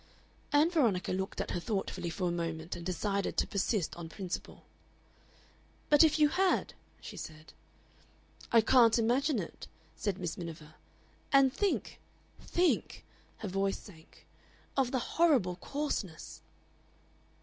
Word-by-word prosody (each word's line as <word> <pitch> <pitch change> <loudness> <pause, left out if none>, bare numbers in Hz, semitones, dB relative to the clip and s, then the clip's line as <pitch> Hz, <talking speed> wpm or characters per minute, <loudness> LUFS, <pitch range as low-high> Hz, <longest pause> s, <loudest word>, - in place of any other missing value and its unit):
Ann 300 +4 +4
Veronica 230 - +2
looked 190 +1 -3
at - - -4
her - - -1
thoughtfully 195 -2 -3
for 180 +2 -2
a - - 0
moment, 165 -1 -3
and 175 - -7
decided 195 +3 -1
to - - +3
persist 200 -2 -1
on 170 -1 -7
principle. 185 +1 -6 1.3
"But 295 +1 +8
if 310 -1 +4
you 300 -1 +5
had?" 375 +3 +1 0.3
she - - -9
said. 155 0 -9 1.0
"I 230 - +7
can't 235 0 +5
imagine 250 +5 +2
it," 185 - -6 0.3
said 200 -3 -2
Miss 175 -3 -4
Miniver. 160 -2 -8 0.6
"And 275 -2 +5
think, 400 +5 -1 0.4
think" 355 0 0 0.3
her 210 - -5
voice 195 +1 0
sank 160 -6 -16 0.5
"of 270 -3 +2
the 260 - 0
horrible 250 - +2
coarseness!" 210 - -4
200 Hz, 130 wpm, -32 LUFS, 175-275 Hz, 1.3 s, But